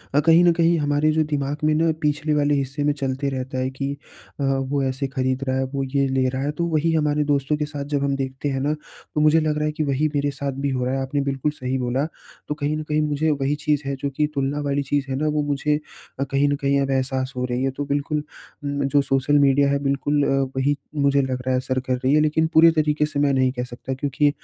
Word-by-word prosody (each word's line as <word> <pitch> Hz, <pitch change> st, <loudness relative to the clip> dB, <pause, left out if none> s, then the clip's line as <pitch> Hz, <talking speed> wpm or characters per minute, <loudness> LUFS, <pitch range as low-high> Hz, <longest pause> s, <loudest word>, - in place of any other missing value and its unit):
अ, -, -, +6 dB
कहीं 165 Hz, +3 st, +5 dB
न 175 Hz, -, +6 dB
कहीं 170 Hz, 0 st, +3 dB
हमारे 145 Hz, +1 st, +2 dB
जो 155 Hz, 0 st, +2 dB
दिमाग़ 145 Hz, +1 st, -2 dB
में 155 Hz, -, +3 dB
ना 165 Hz, +1 st, +3 dB
पिछले 150 Hz, +1 st, 0 dB
वाले 145 Hz, 0 st, +2 dB
हिस्से 140 Hz, +1 st, -2 dB
में 145 Hz, 0 st, +2 dB
चलते 135 Hz, -1 st, -2 dB
रहता 130 Hz, 0 st, -4 dB
है 130 Hz, 0 st, 0 dB
कि 135 Hz, +1 st, -4 dB, 0.5 s
अ, -, -, -1 dB
वो 135 Hz, +1 st, 0 dB
ऐसे 135 Hz, +1 st, -1 dB
खरीद 130 Hz, -1 st, -1 dB
रहा 130 Hz, 0 st, +1 dB
है, 135 Hz, -, +1 dB
वो 135 Hz, -1 st, -1 dB
ये 135 Hz, +1 st, 0 dB
ले 130 Hz, -1 st, +1 dB
रहा 130 Hz, +1 st, -3 dB
है। 145 Hz, -, 0 dB
तो 170 Hz, -, +2 dB
वही 160 Hz, +2 st, +2 dB
हमारे 150 Hz, -1 st, +1 dB
दोस्तों 140 Hz, +1 st, +1 dB
के 150 Hz, -, -1 dB
साथ 145 Hz, -1 st, -6 dB
जब 140 Hz, -, 0 dB
हम 140 Hz, -1 st, +1 dB
देखते 135 Hz, +1 st, -3 dB
हैं 135 Hz, -1 st, -1 dB
ना 145 Hz, +2 st, +1 dB
तो, 150 Hz, 0 st, -7 dB
मुझे 155 Hz, +1 st, +5 dB
लग 155 Hz, -1 st, 0 dB
रहा 150 Hz, -, 0 dB
है 150 Hz, -, 0 dB
कि 155 Hz, +1 st, -2 dB
वही 140 Hz, +1 st, +1 dB
मेरे 145 Hz, 0 st, +1 dB
साथ 140 Hz, 0 st, -3 dB
भी -, -, +2 dB
हो 130 Hz, -2 st, -1 dB
रहा 130 Hz, -, -1 dB
है। 135 Hz, -, -1 dB
आपने 135 Hz, +2 st, -1 dB
बिल्कुल 140 Hz, +1 st, -1 dB
सही 130 Hz, -3 st, -3 dB
बोला। 130 Hz, +2 st, 0 dB, 0.4 s
तो -, -, -1 dB
कहीं 150 Hz, 0 st, -1 dB
न 155 Hz, -, -4 dB
कहीं 150 Hz, 0 st, +2 dB
मुझे 150 Hz, +1 st, 0 dB
वही 140 Hz, 0 st, 0 dB
चीज़ 150 Hz, -1 st, +2 dB
है 140 Hz, 0 st, -2 dB
जो 140 Hz, +1 st, -3 dB
कि 150 Hz, -, +2 dB
तुलना 140 Hz, +1 st, -1 dB
वाली 140 Hz, 0 st, 0 dB
चीज़ 140 Hz, 0 st, -1 dB
है -, -, 0 dB
ना 150 Hz, +3 st, 0 dB
वो 150 Hz, -, +2 dB
मुझे 145 Hz, +1 st, 0 dB, 0.4 s
अ, -, -, +2 dB
कहीं 140 Hz, +1 st, +1 dB
न 145 Hz, -, +1 dB
कहीं 140 Hz, 0 st, +1 dB
अब 135 Hz, 0 st, -1 dB
एहसास 130 Hz, 0 st, -1 dB
हो 125 Hz, -, 0 dB
रही 125 Hz, +1 st, -2 dB
है 135 Hz, -, +1 dB
तो 145 Hz, +2 st, -4 dB
बिल्कुल 145 Hz, +2 st, -1 dB, 0.4 s
उम, 140 Hz, 0 st, -2 dB
जो 145 Hz, +1 st, +3 dB
सोशल 135 Hz, +1 st, +2 dB
मीडिया 140 Hz, 0 st, +4 dB
है 140 Hz, -, +2 dB
बिल्कुल 140 Hz, +1 st, +1 dB
अ, -, -, +1 dB, 0.3 s
वही 135 Hz, +2 st, +1 dB, 0.3 s
मुझे 140 Hz, 0 st, +3 dB
लग 130 Hz, -1 st, -2 dB
रहा 130 Hz, -, 0 dB
है 130 Hz, -, +2 dB
असर 130 Hz, 0 st, -1 dB
कर 130 Hz, 0 st, -2 dB
रही 130 Hz, +2 st, +1 dB
है। 150 Hz, -, +5 dB
लेकिन 155 Hz, +1 st, +2 dB
पूरे 165 Hz, +1 st, +7 dB
तरीके 150 Hz, -1 st, +1 dB
से 150 Hz, -1 st, -3 dB
मैं 145 Hz, -1 st, +3 dB
नहीं 130 Hz, -1 st, +2 dB
कह 125 Hz, -1 st, -3 dB
सकता 125 Hz, +2 st, -6 dB
क्योंकि 140 Hz, +2 st, +1 dB
140 Hz, 270 wpm, -23 LUFS, 135-150 Hz, 0.5 s, पूरे